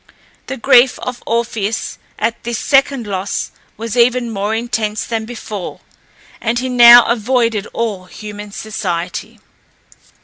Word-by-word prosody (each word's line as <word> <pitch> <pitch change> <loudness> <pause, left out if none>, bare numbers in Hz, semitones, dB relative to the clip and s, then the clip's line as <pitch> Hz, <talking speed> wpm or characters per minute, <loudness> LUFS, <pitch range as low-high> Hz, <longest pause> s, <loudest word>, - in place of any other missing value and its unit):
The 265 - -4
grief 250 0 +5
of 250 -1 -6
Orpheus 230 -2 -2 0.2
at 230 0 -2
this 235 -1 -3
second 275 -2 +2
loss 195 -1 -3 0.3
was 225 0 -4
even 240 0 +2
more 205 +1 -2
intense 225 -2 -2
than 225 -2 -3
before, 215 -5 -7 0.6
and 235 +1 0
he 255 +1 -2
now 240 -1 +9
avoided 230 -2 0
all 210 -5 -3
human 210 +1 -9
society. 180 -5 -4
230 Hz, 125 wpm, -17 LUFS, 210-240 Hz, 0.6 s, now